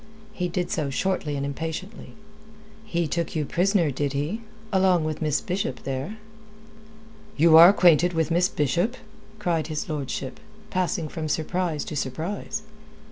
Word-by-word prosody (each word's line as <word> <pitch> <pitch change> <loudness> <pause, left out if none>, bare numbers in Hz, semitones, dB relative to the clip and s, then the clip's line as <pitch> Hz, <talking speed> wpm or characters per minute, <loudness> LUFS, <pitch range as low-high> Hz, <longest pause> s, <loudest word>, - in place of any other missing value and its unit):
He 180 -4 -2
did 180 0 -2
so 155 -9 -1
shortly 155 0 -1
and 140 0 -2
impatiently. 165 +8 -6 0.7
"He 170 -5 -1
took 170 +3 -2
you 155 -2 0
prisoner, 180 -1 +2
did 140 +1 -2
he 150 +11 -2 0.3
along 185 -3 +4
with 155 0 -3
Miss 150 -2 +1
Bishop 180 -8 -3
there?" 135 +10 -4 1.2
"You 160 +2 +6
are 170 +2 +11
acquainted 175 -3 +5
with 165 0 0
Miss 175 +3 +3
Bishop?" 175 - 0 0.4
cried 170 -7 0
his 155 -2 -3
lordship, 140 -3 -4 0.3
passing 180 -3 0
from 155 0 -5
surprise 160 0 -1
to - - -6
surprise. 175 +10 -3
165 Hz, 140 wpm, -25 LUFS, 150-180 Hz, 1.2 s, are